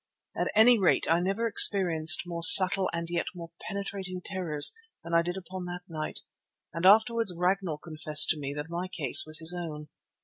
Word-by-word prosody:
At - - -3
any 230 +2 +4
rate 185 - 0
I 165 +1 +1
never 195 +6 -3
experienced 175 -7 +4
more 170 -1 -8
subtle 185 +3 +7
and 170 0 -5
yet 170 0 -4
more 170 -1 -11 0.2
penetrating 195 -2 -7
terrors 175 -6 0 0.3
than 170 - -9
I 170 - +3
did 175 +2 -6
upon 185 -1 -9
that 175 0 -9
night, 155 -2 -8 0.5
and 165 +3 -1
afterwards 225 -1 +2
Ragnall 180 -2 -2
confessed 155 -1 +1
to 155 - -1
me 140 -1 -6
that 150 0 -6
my 170 +2 -6
case 155 -8 -1
was 155 0 -2
his 165 +2 +1
own. 150 -4 -9
175 Hz, 180 wpm, -26 LUFS, 160-190 Hz, 0.5 s, subtle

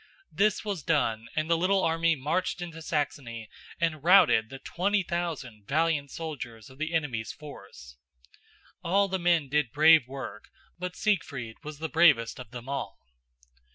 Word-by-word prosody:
This 200 +6 +1
was 200 -6 -3
done 115 -8 0
and 155 0 0
the 170 - +3
little 185 +3 +2
army 165 0 +2
marched 150 +7 -1
into 170 -2 -7
Saxony 135 -8 -3 0.3
and 155 -3 -1
routed 165 -11 +5
the 135 - -8
twenty 195 +8 0
thousand 150 - -4
valiant 155 -1 +1
soldiers 130 -8 -7
of 130 - -17
the 160 +1 -2
enemy's 125 -9 -2
force. 65 - -12 0.9
All 195 +4 +3
the 190 0 -2
men 170 -4 +2
did 145 -3 0
brave 155 -2 +6
work, 130 -6 -8 0.3
but 180 0 -4
Siegfried 140 - -1
was 150 -1 -7
the 160 +2 -3
bravest 150 -9 +4
of 125 -4 -9
them 120 +1 -9
all. 140 0 -4
155 Hz, 155 wpm, -28 LUFS, 130-170 Hz, 0.9 s, brave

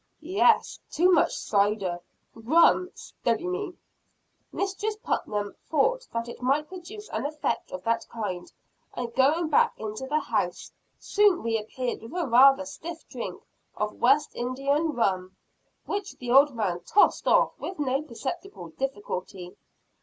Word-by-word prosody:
"Yes, - - +3
too 360 +4 +3
much 340 - +4
cider. 200 -3 0 0.3
Rum 330 +9 +4
steady 235 +9 -3
me!" 365 0 -3 0.8
Mistress 400 +2 -2
Putnam 210 - -2 0.2
thought - - +1
that 230 0 -3
it 240 - -9
might 280 +4 +1
produce 380 +4 -9
an 220 - -3
effect 300 -6 -3
of 185 - -6
that 230 0 0
kind, 195 -6 -5 0.4
and, 240 -1 -4
going 300 +6 +3
back 295 - +3
into 220 +4 -5
the 300 +3 +1
house, - - -2 0.3
soon 410 -4 +2
reappeared 230 +2 -2
with 225 +7 -10
a 350 -2 0
rather 270 +3 +6
stiff 325 +4 -8
drink - - -6 0.3
of - - -1
West - - +4
India 255 +3 -1
rum; 195 - -1 0.5
which 405 0 -4
the 245 -1 -4
old 275 +1 +6
man 190 -6 -1
tossed 410 - +3
off - - +4
with 375 - -6
no 270 -2 0
perceptible 285 - -6
difficulty. 190 -5 -5
270 Hz, 140 wpm, -27 LUFS, 225-345 Hz, 0.8 s, rather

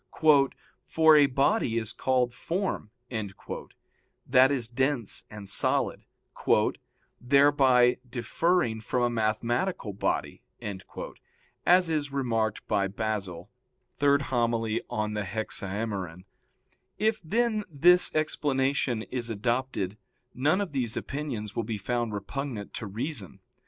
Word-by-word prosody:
"For 160 -1 +6
a 145 -2 +6
body 135 - +1
is 110 -1 -2
called 125 -2 +1
firm," 175 - -3 0.2
that 125 +4 -1
is 125 -5 0
dense 130 -2 0
and 105 -2 -9
solid, - - +2 1.2
"thereby 130 -2 +5
differing 120 - 0
from 125 +3 -1
a 120 - +3
mathematical 115 - -1
body" 100 - -2 1.3
as 180 -1 +5
is 145 -3 -1
remarked 115 -6 -1
by 100 -1 +1
Basil 100 -3 -4 0.5
(Hom. 135 -5 +2
iii 110 0 -1
in 105 0 -2
Hexaem.). 100 -3 -3 0.7
If, 220 0 +1
then, 220 +4 +1
this 175 +4 +4
explanation 135 -5 0
is 120 -1 -4
adopted 115 -2 -2 0.4
none 150 +10 +2
of 195 -5 -3
these 125 -5 -1
opinions 130 -8 -4
will 115 - -1
be 110 0 -3
found 120 +3 -2
repugnant 110 +1 -5
to 110 - -5
reason. 110 - -5
120 Hz, 105 wpm, -28 LUFS, 110-145 Hz, 1.3 s, For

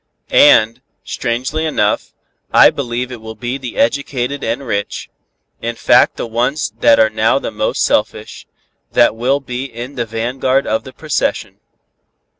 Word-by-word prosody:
And, 115 +3 +5 0.2
strangely 130 +6 -3
enough, 125 -10 -1 0.4
I - - +7
believe 125 -1 -4
it 120 -3 -8
will 110 0 -8
be 120 +5 -4
the 125 -3 -7
educated 140 +1 -1
and 120 +5 -2
rich, 100 -4 -4 0.5
in 115 0 -3
fact - - +4
the - - -3
ones 120 +2 -1
that 115 - +5
are 110 0 +4
now - - +2
the - - -4
most - - -1
selfish, - - -1 0.5
that 120 -2 +4
will 130 +5 +1
be 125 -1 -5
in 120 +1 -8
the 120 -3 -3
vanguard 130 +4 -1
of 110 +1 -1
the 130 - -9
procession. 125 - -3
120 Hz, 150 wpm, -16 LUFS, 115-135 Hz, 0.5 s, I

